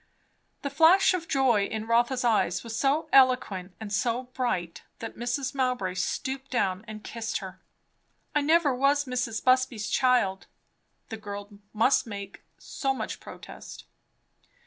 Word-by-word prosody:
The 280 - -3
flash 330 +7 +5
of 345 -2 -3
joy 250 -7 +3
in 220 +1 -4
Rotha's 240 +3 +2
eyes 210 -7 +1
was 230 -1 -6
so 285 +6 +1
eloquent 230 -9 +3
and 215 -2 -6
so 240 +3 0
bright, 240 -10 -3 0.2
that 225 - -7
Mrs. 245 +4 -2
Mowbray 250 -9 -1
stooped 265 +8 -3
down 190 -6 0
and 215 -1 -8
kissed 225 -1 -4
her. 190 -1 -9 0.7
"I 295 - +2
never 310 -1 +3
was 280 +3 +2
Mrs. 250 -3 -2
Busby's 255 -4 +2
child," 245 -7 +2 0.6
the 225 - -5
girl 205 -1 -7 0.2
must 230 +4 +2
make 200 -2 -8 0.2
so 270 -1 -2
much - - -5
protest. - - -11
245 Hz, 140 wpm, -27 LUFS, 210-270 Hz, 0.7 s, flash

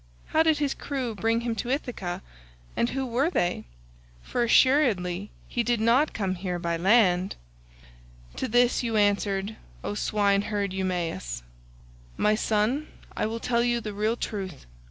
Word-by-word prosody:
How 315 - +3
did 320 -1 +4
his 290 -2 0
crew 260 -5 -3
bring 225 +2 +1
him 235 -1 -1
to 240 - -3
Ithaca, 245 -10 -3 0.5
and 235 - +1
who 265 0 -2
were 260 +6 +1
they?—for - - -4
assuredly 210 -8 +3 0.2
he 240 - -1
did 235 -1 +1
not 240 +7 +3
come 195 -3 -1
here 180 -1 -3
by 170 -1 -1
land." 185 0 +3 1.0
To - - -1
this 245 +2 +3
you 230 -2 -2
answered, 205 0 +1 0.3
O - - -2
swineherd 205 -1 +1
Eumaeus, 170 - -2 0.7
"My 210 - +3
son, 220 +7 +1 0.3
I - - 0
will 225 +1 -4
tell 235 0 +1
you 240 0 +1
the 215 -2 -5
real 215 +3 0
truth. 195 - -5
215 Hz, 145 wpm, -27 LUFS, 185-240 Hz, 1.0 s, did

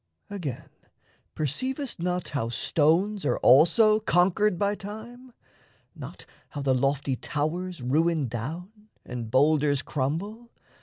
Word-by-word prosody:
Again, 165 -12 -5 0.7
perceivest 255 - -3
not 180 +1 -2
How 125 -6 -2
stones 170 - +1
are - - +1
also 175 - +5
conquered 190 0 +2
by 200 +2 +1
Time? 220 +5 -9 0.6
Not - - -10 0.2
how 145 - -6
the 135 -1 +2
lofty 135 +1 0
towers 155 +4 -3
ruin 155 +2 +1
down, 175 - -7 0.2
And 120 -3 -6
boulders 145 +2 +2
crumble? 195 - -3
165 Hz, 110 wpm, -26 LUFS, 140-205 Hz, 0.7 s, also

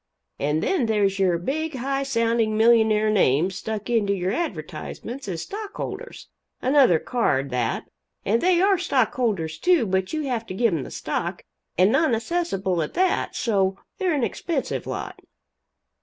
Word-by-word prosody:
And 150 +3 0
then 315 -12 +1
there's 200 -3 +1
your 180 -3 +3
big 300 - -3
high 270 +2 -1
sounding 230 -4 +1
millionaire 220 -2 +4
names 180 -2 +3
stuck 215 0 -4
into 220 -4 +2
your 185 0 -1
advertisements 240 - -5
as 170 -3 -3
stockholders 415 0 -7 0.3
another 260 - +4
card, 140 - 0
that 125 -2 -1 0.4
and 225 +4 +2
they 360 -1 +3
are 390 -2 +4
stockholders, 225 - 0
too, 355 -8 +3
but 190 -1 -1
you 310 -1 -2
have 245 -5 -2
to 185 - -6
give 230 -1 +2
them 160 - -1
the - - -7
stock - - -3 0.3
and 185 +4 +5
non 275 -1 +3
assessable 220 - -1
at 155 - -4
that 370 +1 +1
so 195 -4 +1 0.2
they're 365 -5 +1
an 275 - 0
expensive 290 +3 -2
lot. - - -5
225 Hz, 155 wpm, -24 LUFS, 190-275 Hz, 0.4 s, and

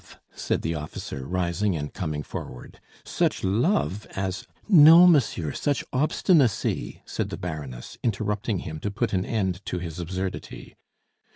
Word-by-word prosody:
said - - -2
the 80 - -1
officer, 75 -3 -6
rising 90 +2 0
and 75 -1 -5
coming 75 -4 -3
forward. 60 - -8 0.3
"Such - - 0
love 105 - +1
as 95 0 -3
" - - -31
"No, 165 -2 +9
monsieur, 120 - +3
such 145 - -1
obstinacy!" 140 - +1
said - - -3
the - - -5
Baroness, 75 -8 -7
interrupting 105 -2 -1
him 80 0 -6
to 105 - -3
put 115 +3 -2
an 95 0 +1
end 95 -4 -1
to - - -2
his 85 -1 -6
absurdity. 95 +2 -5
95 Hz, 145 wpm, -25 LUFS, 85-115 Hz, 0.3 s, No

